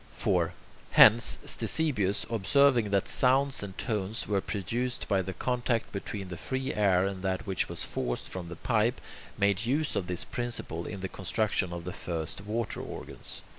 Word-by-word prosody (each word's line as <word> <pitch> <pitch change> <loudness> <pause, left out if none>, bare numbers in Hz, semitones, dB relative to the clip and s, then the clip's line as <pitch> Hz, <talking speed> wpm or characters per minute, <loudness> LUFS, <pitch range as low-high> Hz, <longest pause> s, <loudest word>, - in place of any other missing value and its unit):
4. - - +1 0.4
Hence, 115 +2 +7
Ctesibius, 115 -12 +1
observing 115 +2 +3
that 100 -1 +1
sounds 135 +1 +2
and 100 -2 -7
tones 110 -1 -2
were 100 -2 +1
produced 120 +7 -3
by 95 -1 +2
the 95 - -4
contact 120 +1 -1
between 100 -1 -5
the 90 - -6
free 130 - -3
air 95 -3 +3
and 95 -1 -3
that 95 +3 -2
which 95 -4 -1
was - - 0
forced - - -3
from 90 -2 -6
the 85 - -6
pipe, 115 +5 +1 0.4
made 100 +2 +2
use 150 +4 +1
of 90 - -1
this 90 -1 0
principle 120 -9 -4
in 100 -3 -6
the 95 - -2
construction 95 0 -1
of 85 -1 -5
the 90 - -4
first 85 -1 -3
water 115 +1 -2
organs. - - -5
100 Hz, 170 wpm, -29 LUFS, 95-120 Hz, 0.4 s, Hence